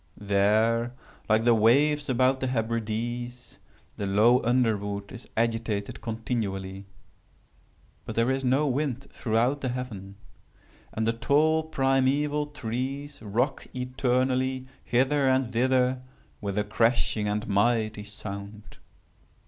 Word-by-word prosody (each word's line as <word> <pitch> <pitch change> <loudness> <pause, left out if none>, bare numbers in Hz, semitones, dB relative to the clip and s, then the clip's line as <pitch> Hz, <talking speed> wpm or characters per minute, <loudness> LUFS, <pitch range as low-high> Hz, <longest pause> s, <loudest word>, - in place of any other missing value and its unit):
There, 110 +4 +2 0.3
like 110 +1 +4
the 120 0 +5
waves 145 +7 +3
about 130 +1 +3
the 130 - -1
Hebrides, 120 +1 -3 0.4
the 100 - -2
low 110 +6 +4
underwood 105 -5 0
is 120 - -10
agitated 115 -3 -1
continually. 100 -4 -4 1.2
But - - -6
there 115 +3 +2
is 135 0 -1
no 135 +4 +2
wind 135 -1 -1
throughout 120 +5 0
the 130 - -1
heaven. 110 -6 -6 0.8
And 110 - -2
the 115 - +2
tall 155 +6 +3
primeval 145 +1 +1
trees 140 +1 -5
rock 120 +6 -1
eternally 130 +1 0 0.2
hither 135 +3 +2
and 130 -2 +1
thither 125 +1 +2 0.4
with 100 -1 -3
a 105 - +2
crashing 110 0 +1
and 105 +1 -2
mighty 110 0 +1
sound. 100 0 -8
120 Hz, 115 wpm, -27 LUFS, 110-130 Hz, 1.2 s, the